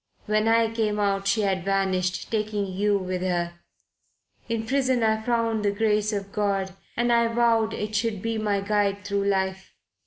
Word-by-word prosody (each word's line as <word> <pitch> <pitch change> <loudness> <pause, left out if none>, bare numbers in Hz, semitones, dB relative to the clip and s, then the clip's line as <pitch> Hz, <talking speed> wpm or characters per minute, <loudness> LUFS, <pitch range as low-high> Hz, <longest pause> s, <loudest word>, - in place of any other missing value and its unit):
When 215 +1 +1
I 225 0 +3
came 215 -2 0
out 195 -1 0
she 215 +3 +2
had 190 -3 0
vanished, 190 -1 0
taking 210 -2 -1
you 200 +2 +1
with 185 -1 -3
her. 175 -2 -2 0.9
In 225 -1 -1
prison 260 -1 +1
I 220 0 +2
found 230 -2 0
the 205 - +3
Grace 210 0 +1
of 200 -1 -4
God 195 -2 -1 0.2
and 240 0 +2
I 235 0 +4
vowed 230 -1 +2
it 210 0 -4
should 215 -1 0
be 225 +2 -2
my 205 -2 0
guide 205 0 0
through 200 0 -1
life. 190 -1 -1
210 Hz, 175 wpm, -25 LUFS, 195-225 Hz, 0.9 s, I